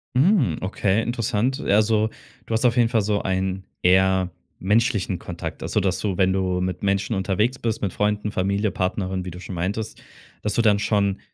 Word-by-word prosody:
Hm, 135 - +3
okay, 100 +2 0
interessant. 120 +3 -1
Also, 110 0 +2 0.4
du - - -4
hast 110 +3 +1
auf 120 -1 +4
jeden 120 -2 +3
Fall 115 -3 +2
so 105 0 0
einen 95 0 -1 0.2
eher 95 0 +3 0.3
menschlichen 100 -2 +1
Kontakt. 85 -1 -6
Also, - - 0
dass 90 -1 0
du, 95 -2 -2
wenn 95 -1 +3
du 95 -1 0
mit 90 0 -3
Menschen 100 +3 0
unterwegs 100 +6 0
bist, 115 -2 -2
mit 100 -3 -2
Freunden, 105 0 0
Familie, 100 +2 0
Partnerin, 95 0 -2
wie 90 - -6
du 90 - -9
schon 95 0 -7
meintest, 100 +6 -3 0.4
dass 105 - -1
du 115 - +2
dann 105 -3 +4
schon 100 -2 +1
100 Hz, 185 wpm, -23 LUFS, 95-110 Hz, 0.4 s, auf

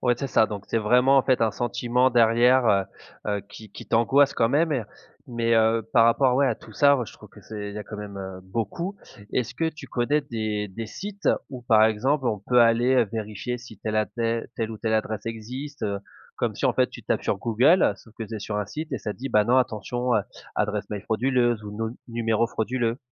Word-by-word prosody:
ouais 120 -1 +2
c'est 135 +1 -4
ça, 110 - +4
donc 100 -2 -6
c'est 115 - +1
vraiment 125 +5 +4
en - - +3
fait 130 -3 +2
un 110 - +3
sentiment 120 +2 +1
derrière, 120 +1 +4 0.6
heu, 105 - 0
heu, - - -6
qui 110 -1 -12
qui - - -9
t'angoisse 135 +5 +3
quand 115 -1 +2
même 160 +5 +2
et, 140 - +1
heu, - - -12 0.4
mais, 115 -2 0
heu, 110 +1 +3
par 115 -2 +6
rapport 125 +2 +3
ouais 140 - +4
à 120 - +1
tout 110 -1 -15
ça 140 +5 +5
moi 125 -4 -1
je - - -12
trouve - - -15
que - - -15
c'est 105 -1 -6
il 100 - -10
y - - -5
a - - -5
quand 105 +1 -9
même, 105 -1 -7
heu, 95 -1 -6
beaucoup. 115 - -3 0.4
Est-ce 125 -3 -1
que 165 0 0
tu 150 - -10
connais 135 +5 +1
des 110 -6 -3
des 110 +4 -6
sites 200 - -4 0.2
où 125 -2 -8
par 110 -3 +4
exemple 130 +6 +1
on 105 - -1
peut 120 +5 +2
aller, 120 +2 +4
heu, 120 -4 +3
vérifier 110 +3 -4
si 120 -2 -12
telle 110 0 -2
à 110 0 +2
tel 115 -1 -2
telle 115 -1 -3
ou 110 - -7
telle 110 -1 0
adresse 110 -1 -2
existe, 125 +6 -6
heu? 100 -2 -1 0.4
Comme - - -1
si - - -4
en - - +4
fait - - +3
tu - - -11
tapes - - -1
sur - - 0
Google, 125 - +4
sauf 110 +3 -18
que 115 - -5
tu 110 - -8
es - - -5
sur 105 +1 -4
un 105 - -2
site 155 +5 -6
et 130 - -1
ça 105 0 -4
dit: 135 +5 -6
«Bah 105 0 +3
non 125 +3 +3
attention, 120 +1 0
heu, 110 - +4 0.4
adresse 105 0 -1
mail 105 -2 -4
frauduleuse 120 0 +1
ou 105 - -7
num 115 +1 -3
numéro 115 -1 +1
frauduleux». 120 +1 -1
115 Hz, 245 wpm, -25 LUFS, 110-125 Hz, 0.6 s, par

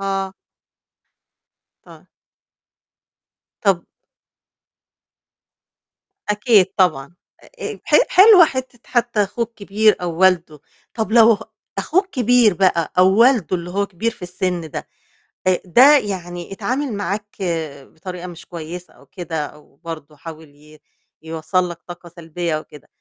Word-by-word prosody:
آه. 195 -1 -3 1.5
طيب. - - -16 1.6
طَب 190 -5 +1 2.5
أكيد 210 -2 +4
طبعًا 170 -3 +1 0.3
أ - - -17 0.3
أ - - -13
ح - - +3
حلوة 380 -2 +8
حِتّة 260 -3 -6
حتّى 235 -3 +1
أخوه 230 +4 -3
الكبير 215 -1 +1
أو 170 -2 -4
والده، 175 -5 +2 0.3
طَب 220 -2 -3
لو 230 0 +7
ه 205 - -4 0.4
أخوه 375 +4 +2
الكبير 245 - +3
بقى 175 -3 +1
أو 185 +2 +5
والده 235 - +4
اللي 170 0 -6
هو 200 +3 -1
كبير 200 +4 -3
في 220 - -20
السن 180 0 -3
ده، - - -7 0.6
آآ 185 -1 +2
ده 260 - +7
يعني 175 -6 -5
اتعامل 255 +4 -3
معاك 205 +1 -4 0.6
بطريقة 180 +2 -8
مش 175 -1 -11
كويسة 170 +1 -9
أو 140 +3 -21
كده 160 0 -5
أو 150 -1 -16
برضه 155 -3 -8
حاول 160 0 -11
ي 150 +1 -19 0.4
يوصّل 165 +3 -2
لك 170 -1 -8
طاقة 175 0 -10
سلبية 170 -1 -4
وكده، 150 -2 -15
185 Hz, 125 wpm, -19 LUFS, 170-220 Hz, 2.5 s, حلوة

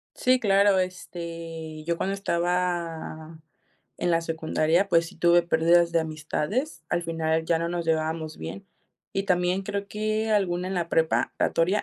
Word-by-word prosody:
Sí, 255 0 +3
claro, 200 -3 +4
este, 165 -3 -5
yo 170 +1 0
cuando 195 +3 -1
estaba 170 -3 -2 0.6
en 175 - 0
la 165 -1 +3
secundaria, 165 +2 +1
pues, 165 -3 +3
sí - - -12
tuve 175 0 +5
pérdidas 170 +1 +3
de 165 0 +2
amistades. 160 - -3
Al 175 0 +1
final 160 -1 -1
ya 165 -1 +2
no 170 +1 -1
nos 175 -1 -2
llevábamos 160 0 -1
bien. 80 +5 -7 0.5
Y 195 - +1
también 180 +1 +1
creo 200 0 -4
que 215 +1 -1
alguna 185 -3 +1
en 190 - -3
la 170 -2 -1
preparatoria, 165 +3 +1
170 Hz, 150 wpm, -26 LUFS, 160-185 Hz, 0.6 s, tuve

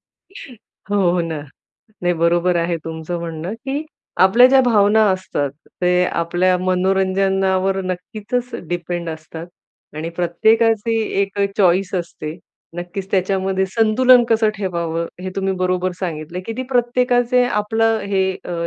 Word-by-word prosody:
हो, 235 - -10 0.2
हो 175 -1 +1
ना. 160 -2 -4 0.6
नाही 175 0 +2
बरोबर 175 +2 +2
आहे 170 0 0
तुमचं 160 +1 -5
म्हणणं 165 +3 -5
की 285 +3 -3 0.4
आपल्या 235 +7 +7
ज्या 265 0 +5
भावना 220 -2 +4
असतात 145 -7 -2 0.3
ते 180 0 +3
आपल्या 175 +2 +1
मनोरंजनावर 190 +1 +1
नक्कीचच 215 +7 -4 0.2
डिपेंड 175 0 -3
असतात 160 +1 -8 0.5
आणि 160 +2 -4
प्रत्येकाची 220 +6 +2 0.2
एक 200 +1 -3 0.2
चॉईस 185 0 +2
असते. 170 -2 -5 0.4
नक्कीच 180 +2 -6
त्याच्यामध्ये 190 0 0
संतुलन 240 +3 +5
कसं 225 -1 +3
ठेवावं 170 -4 -2 0.2
हे 185 - -4
तुम्ही 195 0 -1
बरोबर 185 0 0
सांगितलं 165 -1 -4
की 225 - -4
ती 255 - -2
प्रत्येकाचे 245 0 +2
आपलं 225 0 +1
हे 190 -1 +1
अ, 175 - -4
190 Hz, 125 wpm, -19 LUFS, 175-220 Hz, 0.6 s, आपल्या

